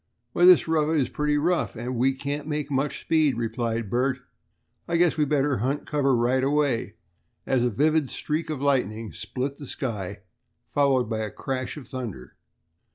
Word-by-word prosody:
"Why, 175 - +4
this 180 -2 +7
road 160 0 +2
is 130 - 0
pretty 150 0 0
rough, 170 0 0
and 120 +3 -4
we 130 +3 +2
can't 145 +2 -4
make 150 -2 -3
much 135 +1 -1
speed," 155 -6 +2
replied 115 -1 -2
Bert. 130 +2 +1 0.7
"I 170 - +1
guess 175 -1 +3
we'd 150 -3 +1
better 145 -2 +2
hunt 135 +7 -1
cover 140 -3 +2
right 125 +2 +2
away," 140 -4 +1 0.5
as 130 -2 +2
a 125 - +2
vivid 150 +5 +2
streak 155 +2 -3
of 145 -3 -3
lightning 115 -6 0
split 135 +2 -4
the 145 - -8
sky, 105 - -4 0.5
followed 135 -4 +3
by 110 -1 -2
a 110 -1 -2
crash 130 +5 -4
of 145 - -9
thunder. 115 - -7
135 Hz, 170 wpm, -25 LUFS, 120-150 Hz, 0.7 s, this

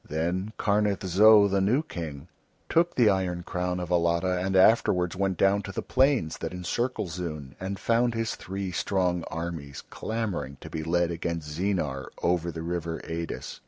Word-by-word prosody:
Then 90 +7 -2
Karnith 105 -2 +1
Zo, 105 +3 +7
the 100 0 +1
new 120 +10 +2
King, 80 - -7 0.4
took 170 +1 +2
the 120 -3 +5
iron 95 -3 +1
crown 90 0 -2
of 90 -1 -5
Alatta 85 +1 +2
and 95 0 -1
afterwards 95 -3 +4
went 95 -1 0
down 100 +3 +3
to 100 - -7
the - - -4
plains 130 - +2
that 80 +1 -4
encircle 120 +7 -2
Zoon 75 -5 -6
and 95 +1 -4
found 115 +2 +1
his 115 -1 -1
three 95 0 -5
strong 90 -1 0
armies 80 -4 -5
clamouring 95 - -3
to - - -9
be 80 - -3
led 85 +1 +1
against 85 -2 -3
Zeenar, 80 -6 -1 0.2
over 85 -1 +1
the 80 0 -6
river 85 -1 -3
Eidis. 85 0 -5
90 Hz, 165 wpm, -27 LUFS, 85-100 Hz, 0.4 s, Zo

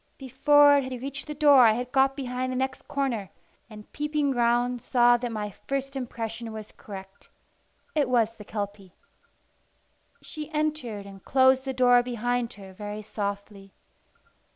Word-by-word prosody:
Before 285 +2 +5
it 280 - +1
had 250 - -5
reached 275 +1 -6
the 300 - -5
door 285 -3 +6
I 220 - +5
had 245 +2 -4
got 270 0 +3
behind 255 -1 -3
the 255 - -3
next 265 0 -3
corner, 265 - -2 0.4
and 210 -1 -13
peeping 295 -1 -1
round 240 0 +1
saw 240 0 +4
that 240 0 -4
my 210 -2 -4
first 275 +6 -5
impression 230 -3 -5
was 215 -1 -8
correct: 195 -1 -11 0.6
it 290 -5 +1
was 230 -2 +2
the 210 - -11
Kelpie. 200 -3 -6 1.3
She 305 -2 -7
entered, 300 -10 -2
and 195 -1 -12
closed 260 0 +3
the 265 - -2
door 245 -1 +5
behind 245 0 -2
her 195 -2 -12
very 210 +2 -7
softly. 200 -1 -6
245 Hz, 155 wpm, -26 LUFS, 215-270 Hz, 1.3 s, door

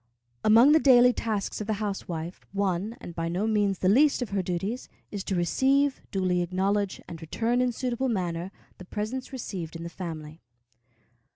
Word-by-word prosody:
Among 230 +6 +7
the 315 - +6
daily 250 -3 +6
tasks 215 -3 -2
of 210 - -5
the 220 - +1
housewife, 190 -5 -4
one, 200 +2 -1
and 175 - -9
by 165 0 -2
no 180 +5 -1
means 205 -3 +1
the 185 - 0
least 270 +6 +4
of 225 - -8
her 200 -1 +1
duties, 190 +7 -3 0.2
is 200 -2 -4
to 195 - -1
receive, 270 +10 +2
duly 185 -2 +1
acknowledge, 190 +3 0
and 170 -1 -8
return 230 +9 0
in 250 -1 +2
suitable 255 +1 -2
manner, 180 -4 -2 0.3
the 185 - -9
presents 220 +8 -4
received 185 - -5
in 165 - -6
the 170 - -5
family. 160 -3 -7
200 Hz, 175 wpm, -27 LUFS, 175-240 Hz, 0.3 s, Among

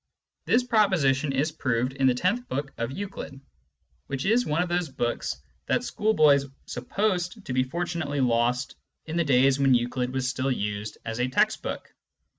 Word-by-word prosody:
This 250 - +3
proposition 175 - +2
is 140 +4 0
proved 125 -4 -1
in 135 -1 +2
the 125 - +3
tenth 220 - 0
book 135 +1 -3
of 115 +2 -2
Euclid, 190 -6 -6 0.7
which 135 -1 -3
is 230 +5 +3
one 155 +4 +1
of - - -4
those 175 -2 -1
books 120 - -2 0.3
that - - +1
schoolboys 155 -10 +3 0.2
supposed 195 0 -2
to 125 - -4
be 130 - +3
fortunately 170 +1 -2
lost 125 +1 +1 0.3
in 160 - -5
the 170 - +2
days 135 -1 +4
when 135 -2 +5
Euclid 125 +1 -1
was 130 -1 -1
still 130 +1 -1
used 105 -3 -3
as 115 +1 -4
a 125 - +2
text 130 - +1
book. - - -6
135 Hz, 170 wpm, -26 LUFS, 125-175 Hz, 0.7 s, when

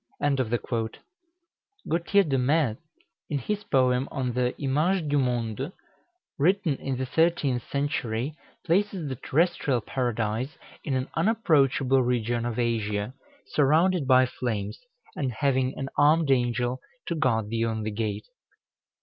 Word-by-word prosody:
Gautier 175 +4 +3
de 135 -6 0
Metz, 130 -3 +1 0.5
in 150 - 0
his 205 - -3
poem 130 -1 +2
on 130 -3 -2
the 125 0 -1
"Image 155 +5 +1
du 145 0 +3
Monde," 125 - -1 0.7
written 175 0 +2
in 135 -2 -3
the 130 - -2
thirteenth 145 -3 +1
century, 140 -2 -1 0.3
places 180 -2 +1
the 130 - -3
terrestrial 145 -2 +1
Paradise 120 +2 -2 0.3
in 140 - -1
an 130 +1 -1
unapproachable 140 - +3
region 120 -1 0
of 120 -1 -4
Asia, 110 -2 -1 0.3
surrounded 155 +2 +2
by 130 -1 +6
flames, 110 -4 -3 0.4
and 130 -4 -2
having 130 +1 0
an 135 - -3
armed 150 0 +4
angel 120 0 +1 0.2
to - - -2
guard 115 -9 +1
the 115 0 0
only 110 -1 -2
gate. 105 -1 -3
130 Hz, 125 wpm, -26 LUFS, 120-150 Hz, 0.7 s, by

